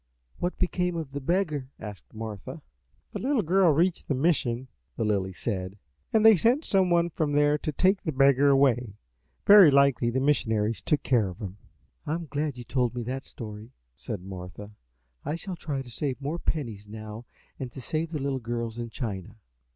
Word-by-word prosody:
"What 175 - -2
became 180 -1 0
of 160 -5 -4
the 140 +1 -5
beggar?" 155 -4 0
asked 105 -3 -9
Martha. 110 -3 -7 0.5
"The - - -5
little 260 -3 +1
girl 180 +1 +4
reached 170 +4 +1
the 140 - 0
mission," 130 -4 +1 0.3
the - - 0
Lily 100 -3 0
said, 95 +1 -4 0.3
"and 220 0 +3
they 220 -1 +9
sent 240 - +2
some 190 -2 +3
one 170 0 +2
from 150 -2 -1
there 145 0 +4
to 155 - -2
take 190 +7 +2
the 160 - -2
beggar 140 0 +4
away. 125 -5 +3 0.5
Very 200 -5 +9
likely 140 -3 +4
the 125 +2 0
missionaries 115 -6 +1
took 145 -2 0
care 115 -7 +2
of 90 - -9
him." 100 -2 -7 0.5
"I 155 - 0
am 170 0 -5
glad 145 -2 -3
you 120 - -7
told 125 0 0
me 120 - -3
that 130 +3 -4
story," 110 -1 -9 0.2
said 100 -4 -6
Martha. 95 +2 -8 0.5
"I 150 +3 -2
shall 180 +2 -5
try 145 -5 -4
to 125 - -11
save 135 +1 -2
more 145 +5 -3
pennies 115 -13 -3
now 110 +2 -8 0.3
to 130 0 -6
send 155 +5 -2
to - - -13
the 145 - -2
little 135 -1 -1
girls 115 -1 -4
in 120 0 -4
China." 105 -4 -5
135 Hz, 190 wpm, -27 LUFS, 115-160 Hz, 0.5 s, they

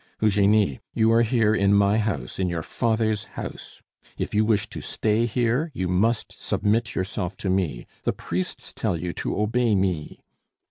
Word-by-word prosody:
"Eugenie, 105 -7 +3 0.2
you 110 0 +4
are 115 +1 +5
here, 115 -2 +3
in 100 -1 +3
my 100 +2 +4
house, 95 - -3
in 95 -1 +1
your 85 -2 -3
father's 110 -1 0
house. - - -7 0.3
If - - -3
you 105 +1 +3
wish 105 -2 +1
to - - -6
stay 110 +2 0
here, 125 +7 +1
you 95 - -1
must 105 +6 0
submit 110 +2 0
yourself 95 0 -3
to 95 - -1
me. 85 -11 -1 0.2
The - - 0
priests 90 +2 -4
tell 85 - -1
you 85 +1 -3
to - - -3
obey 115 +1 +2
me." 95 -6 -1
105 Hz, 170 wpm, -25 LUFS, 95-110 Hz, 0.3 s, are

